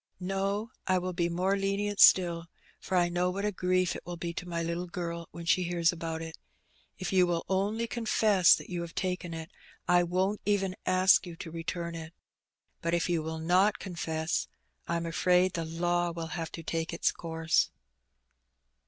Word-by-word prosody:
" - - -48
No, 195 +4 -2 0.2
I 185 0 +3
will 180 0 -2
be 170 0 0
more 185 +3 +1
lenient 200 +1 -1
still, 170 -2 +6 0.3
for 185 - -1
I 175 -1 +4
know 175 +1 0
what 200 +3 -3
a 210 - +1
grief 185 -1 +1
it - - -7
will 175 0 -6
be 170 0 -4
to 180 +1 -6
my 170 -1 -2
little 170 +2 -3
girl 170 -2 -5
when 170 0 -9
she 175 +2 +3
hears 170 -1 +2
about 165 -1 -4
it. 160 0 -9 0.6
If 185 +1 -4
you 185 -1 +5
will 170 -1 -1
only 205 +4 0
confess 215 -5 +4
that - - -9
you 175 -1 -2
have 170 -1 -7
taken 180 -2 -2
it, 160 +2 -7 0.4
I 175 0 +5
won't 185 +4 0
even 195 -2 0
ask 185 0 +5
you 170 - -7
to 165 - -8
return 170 +1 -4
it. 165 0 -8 0.7
But 170 +1 +1
if 170 +1 0
you 170 -2 +1
will 160 +1 -4
not 180 +6 +3
confess, 160 -3 -2 0.4
I'm 170 0 -1
afraid 180 +2 +2
the 165 -2 -2
law 175 +2 0
will 165 -1 -5
have 165 -3 -4
to 165 - -7
take 165 +1 -2
its 170 - +2
course." 165 -1 0
175 Hz, 190 wpm, -30 LUFS, 170-185 Hz, 0.7 s, still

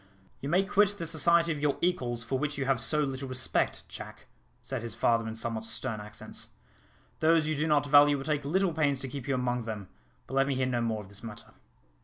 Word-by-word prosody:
"You 140 - -4
may 185 +5 +4
quit 205 +1 +2
the 170 - -4
society 170 +1 +3
of 150 - -2
your 145 -1 +1
equals, 125 -10 0
for 130 +3 -2
which 150 0 -2
you 135 - -1
have 135 -3 +1
so 150 +5 +2
little 135 -1 -3
respect, 130 0 0
Jack," - - -9 0.4
said 130 -1 -4
his 115 -1 -4
father 115 -1 +2
in 110 - -5
somewhat 115 -1 -2
stern 110 0 -3
accents; 105 0 -6 0.7
"those 160 -1 +4
you 155 - 0
do 150 +3 0
not 145 -2 +3
value 145 0 +6
will 135 - -6
take 150 -1 0
little 180 +5 +1
pains 145 -4 +1
to 135 - -3
keep 135 -1 -7
you 135 - +1
among 125 -2 -1
them; 105 -4 -6 0.4
but - - -11
let 135 0 +3
me 140 - 0
hear 130 0 +1
no 125 -2 0
more 110 -2 -1
of - - -14
this 100 0 -8
matter. 110 -2 -9
135 Hz, 230 wpm, -29 LUFS, 115-150 Hz, 0.7 s, value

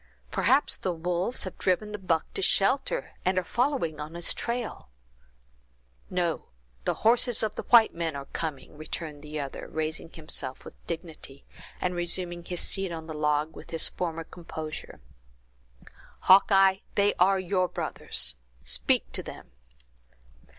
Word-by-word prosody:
"Perhaps 275 +3 +3
the 185 - -1
wolves 175 +6 -1
have 185 - -7
driven 200 +3 +1
the 210 - -5
buck 170 -4 +1
to 395 - -1
shelter, - - +2
and 185 0 +1
are 185 - +3
following 235 - 0
on 150 +3 -6
his 170 -1 +2
trail." 235 - -4 1.2
"No. 175 -3 -1 0.4
The - - +1
horses 235 0 +4
of 215 - -1 0.2
white 235 -2 +8
men 165 -3 -2
are 140 0 -5
coming!" 150 -3 -5
returned 155 -1 -5
the 150 0 -5
other, 140 -2 -5
raising 160 +1 -3
himself 155 -5 -1
with - - -9
dignity, 160 -5 -7 0.3
and 180 - 0
resuming 175 0 -2
his 180 -1 -1
seat 195 -2 +2
on 160 -1 -5
the 160 - -6
log 150 +1 0
with - - -11
his 165 -1 0
former 165 -2 -3
composure. 160 - -8 1.2
"Hawkeye, 195 0 +6 0.2
they 205 0 +4
are 190 +2 +5
your 185 0 +1
brothers; - - -2 0.3
speak - - +2
to - - +1
them." - - -10
175 Hz, 145 wpm, -28 LUFS, 160-195 Hz, 1.2 s, white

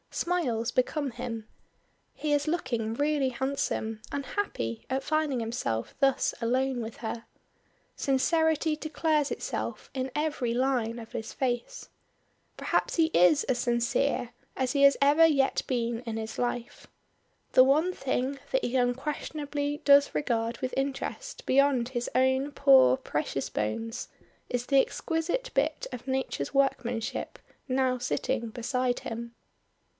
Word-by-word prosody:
Smiles 255 -11 0
become 275 +2 0
him. 230 -3 -6 0.7
He 300 -1 -1
is 290 +1 +1
looking 240 -9 -1
really 290 -1 +1
handsome 245 -4 -2
and 280 -1 -3
happy 115 - -3
at 265 +1 -1
finding 305 -4 0
himself 225 - -3
thus 275 -2 +2
alone 255 +2 +1
with 225 0 -6
her. 230 0 -5 0.7
Sincerity 315 +3 +2
declares 305 -1 0
itself - - -4
in 260 0 -3
every 295 -6 -1
line 245 -3 0
of 225 -1 -9
his 225 0 -5
face. 255 - -3 0.7
Perhaps - - 0
he 330 - +4
is 180 - +5
as 255 -3 0
sincere 240 +1 0 0.3
as 260 -1 0
he 280 - +1
has 280 -1 +7
ever 290 +4 +6
yet 275 -4 +3
been 235 -2 -1
in 230 -2 -5
his 220 0 -5
life. 245 -1 -3 0.7
The 255 - +8
one 305 +7 +3
thing 270 -2 -2
that - - +1
he 245 - -2
unquestionably 290 +3 -1
does 280 0 +6
regard 230 -4 0
with 255 -1 -3
interest 280 - -3
beyond 265 -3 +3
his 245 -2 -3
own 260 +2 +2
poor 130 - +6
precious 145 -2 -3
bones, 225 - -3 0.4
is 245 0 -1
the 275 0 +5
exquisite 345 - -2
bit 295 +3 0
of 250 +1 -8
nature's 265 - -2
workmanship 245 -4 0 0.3
now 255 -1 +1
sitting 245 -1 -1
beside 250 +2 -1
him. 235 +1 -6
260 Hz, 135 wpm, -28 LUFS, 235-285 Hz, 0.7 s, The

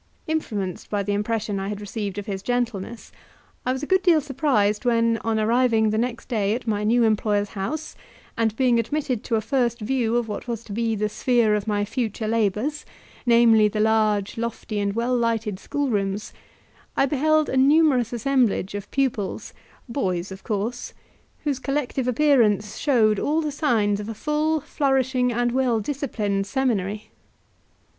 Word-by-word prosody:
Influenced 210 - -3
by 205 -1 -1
the 205 +1 -1
impression 210 -1 -1
I 195 - -3
had 205 0 -4
received 205 -1 -5
of 205 - -4
his 195 -3 -4
gentleness, 235 -2 -3 0.6
I - - +3
was 260 +2 -3
a - - 0
good 375 +4 +2
deal 345 -4 +5
surprised 270 -8 0
when, 230 -1 +2
on 225 0 -1
arriving 225 -1 +3
the 215 - 0
next 240 0 -3
day 215 -4 0
at 245 - -6
my 210 -2 -1
new 235 +3 +3
employer's 210 -2 +1
house, 290 +11 -4 0.4
and 225 -2 0
being 245 -1 +3
admitted 255 -1 -2
to 230 - 0
a 220 - +1
first 240 -1 0
view 235 0 0
of 240 -2 -1
what 210 +3 -6
was 230 -2 -4
to 220 - -12
be 225 +1 0
the 210 0 0
sphere 230 0 +2
of 210 0 -1
my 205 -1 0
future 220 -1 -3
labours, 225 +7 0 0.4
namely 230 -2 +6
the 210 +1 -3
large, 215 -1 +1
lofty, 230 -2 -3
and 200 0 0
well 235 +3 0
lighted 225 -4 -1
schoolrooms, 205 -8 -2 0.6
I - - +4
beheld 305 +3 +2
a - - -2
numerous 270 -3 +4
assemblage 245 -6 +1
of 205 0 -6
pupils, 255 -8 -2 0.3
boys 190 -7 -2
of 190 0 -9
course, 220 +3 -3 0.5
whose 285 -3 -1
collective 275 -2 -2
appearance 235 -6 +2
showed 220 -7 +3
all 305 +2 +1
the 305 -2 -2
signs 225 -9 +1
of 210 +1 -6
a 225 - -5
full, 300 +5 0
flourishing, 260 -3 +1
and 240 +1 0
well 250 -3 +1
disciplined 210 -6 -2
seminary. 215 -5 -1
230 Hz, 165 wpm, -24 LUFS, 210-260 Hz, 0.6 s, namely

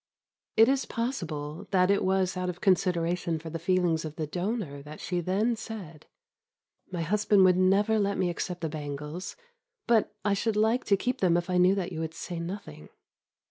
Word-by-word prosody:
It 225 +1 +8
is 270 0 +1
possible 165 - -4
that 185 -1 +3
it 200 - +2
was 190 -1 +1
out 180 0 -2
of 180 0 -5
consideration 175 -3 +1
for 160 0 -8
the 165 - -4
feelings 175 -2 +1
of 155 -1 -6
the 155 - -2
donor 175 -3 -3
that 150 +2 -10
she 175 -1 -2
then 205 +7 +1
said 200 -9 -9 0.8
"My 175 -2 -2
husband 205 +2 +3
would 180 -1 +5
never 195 +4 +3
let 200 -1 0
me 180 -1 +1
accept 180 +1 -4
the 165 - -1
bangles, 150 +3 -6 0.5
but 230 -2 +3
I 205 - +3
should 215 +2 0
like 220 +4 +2
to 200 - +3
keep 250 +6 -2
them 175 -3 +4
if 175 +1 -2
I 180 - +2
knew 185 +2 +5
that 190 -2 -3
you 160 - -5
would 160 0 -4
say 175 -2 -5
nothing." 170 - -7
180 Hz, 190 wpm, -28 LUFS, 165-200 Hz, 0.8 s, It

